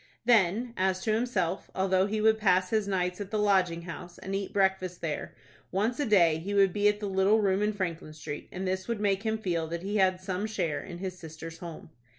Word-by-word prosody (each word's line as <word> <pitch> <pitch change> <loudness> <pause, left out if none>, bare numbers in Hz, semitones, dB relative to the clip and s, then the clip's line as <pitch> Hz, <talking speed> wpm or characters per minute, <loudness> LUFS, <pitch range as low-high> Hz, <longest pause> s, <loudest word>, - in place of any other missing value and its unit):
Then, 230 +1 +3
as 185 0 +1
to 215 - +1
himself, 210 -6 -1
although 190 0 +2
he 215 +1 -1
would 220 0 +4
pass 185 -3 +3
his 215 -2 +1
nights 180 -1 -1
at 200 - -5
the 215 - -1
Lodging 190 -5 +2
House, 175 +1 -8
and 195 - -6
eat 195 0 -2
breakfast 190 -2 +1
there, 155 -3 -4 0.4
once 215 +7 0
a 290 - 0
day 170 -7 +4
he 200 +5 -4
would 195 -2 +4
be 205 0 +3
at 210 0 +2
the 210 - -4
little 195 +3 +3
room 195 -1 +2
in 210 0 +2
Franklin 170 -6 -4
Street, 150 -1 -7
and 190 +1 -4
this 185 0 -2
would 235 -3 -2
make 200 -2 +1
him 220 0 -1
feel 170 -6 -1
that 170 +2 -5
he 205 +2 -1
had 185 -2 +3
some 185 +2 -3
share 175 -9 -2
in 175 - -8
his 185 0 -5
sister's 160 0 -9
home. 165 -2 -9
190 Hz, 225 wpm, -29 LUFS, 180-210 Hz, 0.4 s, would